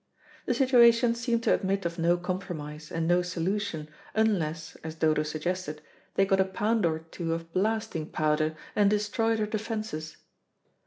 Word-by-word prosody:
The - - +2
situation 240 -3 +5
seemed 235 0 -1
to - - +4
admit 195 0 0
of 170 0 -3
no 170 +1 +3
compromise 165 -4 -5
and 165 0 -1
no 175 +1 +4
solution, 180 -1 -2 0.3
unless, 170 -8 0
as 160 0 -7
Dodo 155 -1 +2
suggested, 155 +1 -3 0.4
they 195 - +4
got 195 -1 +2
a - - +6
pound 210 +1 +1
or 160 -1 0
two 165 +1 -4
of 165 0 -8
blasting 215 -5 -1
powder 155 0 +1 0.2
and 205 -1 +4
destroyed 215 +2 +1
her 215 - +1
defences. 215 -7 -4
185 Hz, 155 wpm, -28 LUFS, 160-215 Hz, 0.4 s, a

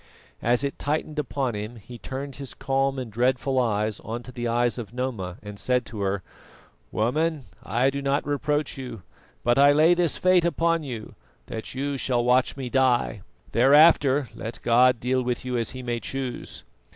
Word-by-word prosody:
As 120 +3 +2
it 140 - -3
tightened 150 +1 -2
upon 135 -3 -1
him, 105 +3 -5
he 120 +2 -11
turned 135 0 -6
his 140 -2 -8
calm 135 0 0
and 125 -4 -5
dreadful 130 +3 +1
eyes 105 -3 0
on 115 +2 -6
to 125 - -10
the 120 -1 -3
eyes 120 +1 +1
of 115 0 -8
Noma 110 -8 -3
and 105 -1 -8
said 125 0 +1
to 110 -3 -7
her: 95 -1 -1 0.7
"Woman, 150 +5 0 0.2
I 125 +3 +1
do 140 +1 -4
not 140 +1 0
reproach 145 0 -1
you; 125 -7 -7 0.4
but 120 +2 +3
I 140 +1 +7
lay 155 +4 +5
this 175 -3 +1
fate 185 -1 +4
upon 165 -1 +1
you, 120 -7 -7 0.3
that 110 +3 -6
you 140 +1 -2
shall 125 -2 0
watch 125 +2 +2
me 130 -2 -4
die. 125 -5 +1 0.3
Thereafter, 140 +1 +5
let 115 +1 -6
God 125 +1 +4
deal 130 +2 +1
with 125 +1 -2
you 125 -1 -2
as 115 -1 0
He 130 0 -7
may 120 -1 -2
choose." 130 0 -5
130 Hz, 180 wpm, -25 LUFS, 120-140 Hz, 0.7 s, I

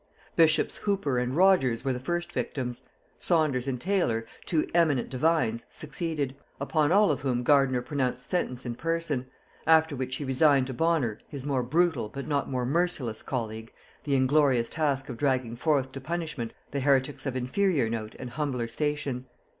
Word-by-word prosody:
Bishops 160 -2 +4
Hooper 195 -11 0
and 125 +2 -1
Rogers 175 -11 +4
were 135 - +1
the 125 - -4
first 175 +6 -3
victims; 125 -8 -3 0.4
Saunders 150 -7 +1
and 130 -2 -2
Taylor, 160 - 0 0.2
two 160 -3 +1
eminent 155 -8 +2
divines, 130 -5 +1
succeeded; 150 -3 -3 0.2
upon 150 +2 +1
all 205 +2 +5
of - - -2
whom 125 -3 0
Gardiner 135 -2 +3
pronounced 125 -2 -2
sentence 130 -8 -2
in 120 - -2
person; 160 -3 -2 0.4
after 160 -2 +5
which 130 0 -3
he 145 - -4
resigned 135 0 +4
to 130 - -5
Bonner, 135 -6 +1
his 140 -2 -7
more 140 -3 +1
brutal 145 -3 +1
but 140 +3 -6
not 145 -2 -1
more 125 -2 -1
merciless 140 -7 0
colleague, 110 -3 -4 0.3
the 140 -2 0
inglorious 130 -3 +3
task 145 -3 0
of 120 - -6
dragging 130 -4 0
forth 135 0 +1
to 135 - -7
punishment 155 -6 -4 0.2
the 140 - -1
heretics 140 +1 +1
of 130 - -2
inferior 135 - +1
note 110 -1 -4
and 125 -1 -7
humbler 130 -4 -2
station. 145 0 -2
135 Hz, 165 wpm, -28 LUFS, 125-155 Hz, 0.4 s, all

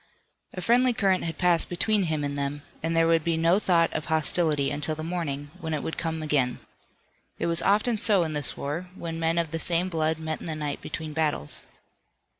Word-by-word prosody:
A 185 - -4
friendly 245 +5 +4
current 195 -6 +1
had 165 -1 -4
passed 175 -2 +2
between 205 +2 +2
him 155 -3 -1
and 140 0 -2
them, 140 +1 -3 0.2
and 165 +1 0
there 165 - +5
would 165 -1 +3
be 165 0 0
no 165 +4 +4
thought 170 -5 +2
of 155 - -3
hostility 155 -2 +2
until 150 +2 -2
the 155 - -6
morning, 145 -4 -3
when 160 -3 -2
it 150 - -4
would 160 - -4
come 160 -1 -3
again. 135 -5 +1 0.8
It - - -2
was 170 0 0
often 215 +3 +2
so 200 -5 +4
in 160 -2 -3
this 145 -3 -2
war, 155 +6 -4
when 165 -3 -5
men 165 +1 +1
of 165 -2 0
the 165 - -2
same 175 +2 +2
blood 160 -2 0
met 160 -1 -4
in - - -8
the 160 - -2
night 150 -2 -3
between 155 -1 -5
battles. 150 - -2
165 Hz, 215 wpm, -26 LUFS, 150-175 Hz, 0.8 s, there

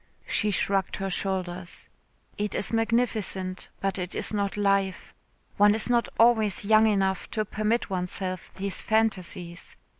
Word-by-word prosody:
She 210 - 0
shrugged 195 -1 0
her 195 -1 -3
shoulders. 185 -2 -3 0.5
"It 210 -1 -2
is 205 - -2
magnificent, 225 -5 0
but 195 -1 -1
it 180 0 -4
is - - -1
not 200 -1 -1
life. 195 -2 0 0.4
One 205 +1 +6
is 225 +2 +4
not 235 -1 +2
always 220 -4 +3
young 220 +1 +5
enough 195 -3 0
to 215 -1 -1
permit 215 +1 -1
oneself 185 0 -3
these 195 0 -3
phantasies. 185 -6 -1
200 Hz, 140 wpm, -27 LUFS, 190-215 Hz, 0.5 s, One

